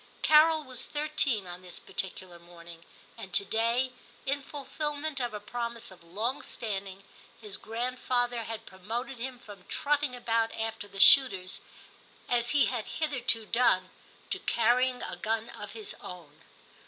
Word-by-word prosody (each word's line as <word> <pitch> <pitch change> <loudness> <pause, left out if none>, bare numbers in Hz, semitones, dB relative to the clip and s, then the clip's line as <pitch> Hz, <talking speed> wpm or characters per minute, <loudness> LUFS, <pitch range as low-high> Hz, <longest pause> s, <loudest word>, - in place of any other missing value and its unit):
Carol 310 +1 +6
was 255 -3 -5
thirteen 295 -8 0
on 175 0 -8
this 180 -1 -8
particular 185 -2 -3
morning, 170 -1 -13 0.4
and 190 - -8
to 200 - +4
day, 235 +5 +1 0.3
in 280 +1 0
fulfilment 295 +1 -3
of 245 -2 -1
a 210 - -5
promise 235 +1 -4
of 185 - -15
long 220 +11 -2
standing, 195 -3 -4 0.4
his 210 -3 -4
grandfather 245 0 -1
had 225 -1 -5
promoted 230 +7 -5
him 255 +1 -4
from 205 -6 -13
trotting 290 -2 0
about 230 -2 +1
after 225 -2 -3
the 195 - -9
shooters, 195 -7 +7 0.7
as 240 -1 +2
he 290 +1 +5
had 240 -4 -2
hitherto 250 -7 +1
done, 185 -6 +3 0.4
to - - 0
carrying 250 +2 +2
a - - -4
gun 225 +1 -1
of - - -8
his 425 -2 -5
own. 165 -5 -10
235 Hz, 145 wpm, -30 LUFS, 195-260 Hz, 0.7 s, shooters